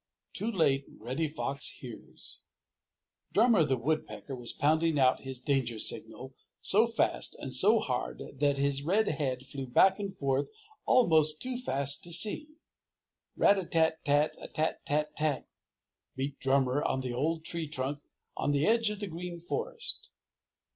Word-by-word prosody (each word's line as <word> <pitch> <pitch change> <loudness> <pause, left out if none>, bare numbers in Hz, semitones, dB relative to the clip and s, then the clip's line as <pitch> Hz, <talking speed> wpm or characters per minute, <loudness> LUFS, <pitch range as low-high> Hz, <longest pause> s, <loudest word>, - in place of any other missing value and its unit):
Too 225 +3 -1
Late 140 -8 +1
Reddy 130 +8 -3
Fox 140 -2 -2
Hears 115 - -10 0.9
Drummer 220 -5 +4
the 130 -3 0
Woodpecker 145 +1 -3
was 120 -2 -4
pounding 160 +2 +1
out 130 -2 +3
his 130 -1 -7
danger 125 -3 -1
signal - - -4 0.3
so - - +5
fast - - 0
and - - -6
so - - +5
hard - - -3 0.2
that 145 -1 +2
his 140 0 0
red 195 +9 +1
head 130 -4 -3
flew 135 -1 -7
back 190 - +4
and 195 -2 -5
forth 140 -2 -1 0.4
almost 160 - +4
too 255 0 0
fast 140 - 0
to 170 - -5
see. 210 - +5 0.9
Rat 200 0 +4
a - - -3
tat 160 -1 +1
tat 145 +1 +2
a - - -8
tat 155 +1 -2
tat, 150 0 -1 0.7
beat 135 +1 -4
Drummer 135 0 +1
on 130 - -1
the 125 -2 -4
old 160 +5 -2
tree 170 -2 -1
trunk 140 0 -3 0.4
on - - -2
the 145 +1 +1
edge 225 0 +3
of 210 0 -6
the 205 - -3
Green 175 0 -7
Forest. 470 - -4
150 Hz, 155 wpm, -30 LUFS, 135-175 Hz, 0.9 s, so